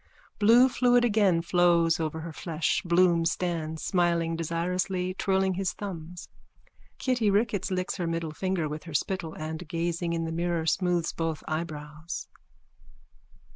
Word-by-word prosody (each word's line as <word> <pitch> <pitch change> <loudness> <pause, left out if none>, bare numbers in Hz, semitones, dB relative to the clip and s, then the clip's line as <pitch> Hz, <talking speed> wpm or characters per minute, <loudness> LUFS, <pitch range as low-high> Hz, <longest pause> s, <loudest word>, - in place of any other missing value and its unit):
Blue 235 +5 +7
fluid 245 -1 +3
again 200 -7 +3
flows 170 -1 +3
over 160 0 -2
her 165 0 -7
flesh. 165 0 -1
Bloom 170 -1 +3
stands, 165 -2 -2
smiling 170 -2 +1
desirously, 180 +3 -1
twirling 190 0 +1
his 185 -1 -1
thumbs. 175 -4 -7 0.7
Kitty 245 -5 +1
Ricketts 205 -1 +1
licks 185 0 -2
her 175 -3 -2
middle 165 -1 -2
finger 185 -1 -1
with 150 +2 -6
her 165 -3 -7
spittle 175 -1 -2
and, 160 +2 -6
gazing 170 +1 -2
in 165 0 -1
the 165 - -3
mirror, 170 0 -1
smooths 175 0 +1
both 165 -2 -3
eyebrows. 155 0 -5
170 Hz, 135 wpm, -28 LUFS, 165-185 Hz, 0.7 s, Blue